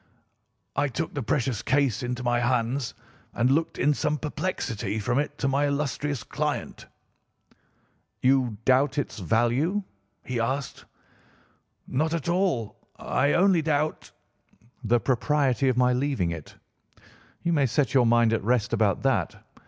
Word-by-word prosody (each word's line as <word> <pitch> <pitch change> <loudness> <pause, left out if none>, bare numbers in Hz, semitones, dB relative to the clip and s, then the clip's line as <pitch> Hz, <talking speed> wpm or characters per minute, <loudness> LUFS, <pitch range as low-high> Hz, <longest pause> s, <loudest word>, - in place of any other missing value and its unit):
"I 145 - +2
took 160 +5 -4
the 145 - -3
precious 120 -1 -1
case 135 -2 +1
into 125 0 -3
my 120 0 +1
hands 125 +1 0 0.4
and 120 +2 +2
looked 160 +4 0
in 150 +2 +3
some 150 +1 -1
perplexity 120 - -3
from 120 +5 0
it 145 - -3
to 135 - -1
my 140 +2 +2
illustrious 140 -2 -2
client. - - -4 1.3
"'You 130 -4 +2
doubt 130 +3 +3
its 140 -6 -3
value?' 120 - +1 0.4
he 125 -2 -3
asked. 130 +4 -3 1.0
"'Not 155 +5 0
at 170 - -4
all. 170 - 0 0.2
I 140 +1 +1
only 185 -1 +4
doubt—' 155 0 -1 0.7
"'The 120 +2 +3
propriety 135 +2 +1
of 125 - 0
my 125 0 +4
leaving 125 -9 0
it. 80 -3 -8 0.9
You 170 0 +1
may 145 -4 +3
set 140 +3 0
your 125 -3 +4
mind 115 -1 +4
at 115 - 0
rest 120 0 +1
about - - +1
that. - - +1
130 Hz, 140 wpm, -26 LUFS, 120-145 Hz, 1.3 s, only